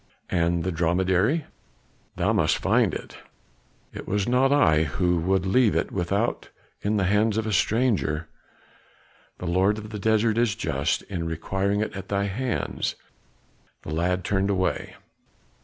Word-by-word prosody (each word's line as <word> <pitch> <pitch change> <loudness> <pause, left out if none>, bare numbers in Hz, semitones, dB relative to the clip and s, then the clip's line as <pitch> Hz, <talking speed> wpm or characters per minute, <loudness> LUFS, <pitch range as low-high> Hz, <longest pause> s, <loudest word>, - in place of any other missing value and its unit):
"And 85 -1 +1
the 95 - -1
dromedary?" 95 - +1 0.7
"Thou - - +1
must - - +2
find - - +2
it. - - -8 0.7
It - - -8
was 100 0 0
not 130 +2 +3
I 80 - +4
who 90 +4 0
would 95 +2 +1
leave 110 +3 +3
it - - 0
without 100 +5 -1 0.3
in 105 +1 0
the 100 - +1
hands 105 +3 +2
of 110 - -1
a 110 - -2
stranger. 100 -8 +1 1.1
The - - -7
lord 95 +4 +2
of 105 0 -8
the 105 - -5
desert 110 +1 +2
is 120 -4 +2
just - - -1
in 85 -4 -4
requiring 95 +5 -1
it 110 - -2
at 95 0 -7
thy 100 0 0
hands." 115 +5 -2 0.9
The 75 - -5
lad 90 +3 0
turned 100 0 0
away. 95 -2 -1
95 Hz, 150 wpm, -25 LUFS, 90-110 Hz, 1.1 s, I